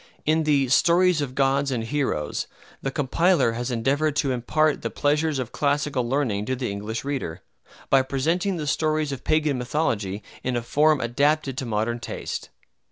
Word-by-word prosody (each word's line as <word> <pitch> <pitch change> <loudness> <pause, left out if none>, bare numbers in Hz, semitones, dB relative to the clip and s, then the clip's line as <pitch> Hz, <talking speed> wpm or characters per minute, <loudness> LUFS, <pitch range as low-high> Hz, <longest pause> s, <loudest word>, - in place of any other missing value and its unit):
In 160 +1 +2
the 140 -3 +3
"Stories 170 +4 +4
of 130 -3 -4
Gods 140 0 +2
and 120 -4 -1
Heroes" 115 - -2 0.3
the 135 - -1
compiler 150 +2 +2
has 120 +2 -3
endeavored 140 +5 0
to 145 -3 +1
impart 150 +5 +1
the - - -2
pleasures 150 +1 +1
of 125 -4 -4
classical 140 -4 0
learning 120 -7 0
to 130 - 0
the 125 -4 -3
English 105 +3 -4
reader, 110 - -3 0.5
by 135 - +6
presenting 165 +8 0
the 155 - -3
stories 155 0 0
of 135 -2 -6
Pagan 155 -4 +1
mythology 110 -7 -1 0.2
in 130 -1 -1
a 120 - -1
form 150 +4 +3
adapted 140 +3 +1
to 130 - -4
modern 115 +2 -1
taste. - - -5
140 Hz, 165 wpm, -24 LUFS, 120-155 Hz, 0.5 s, by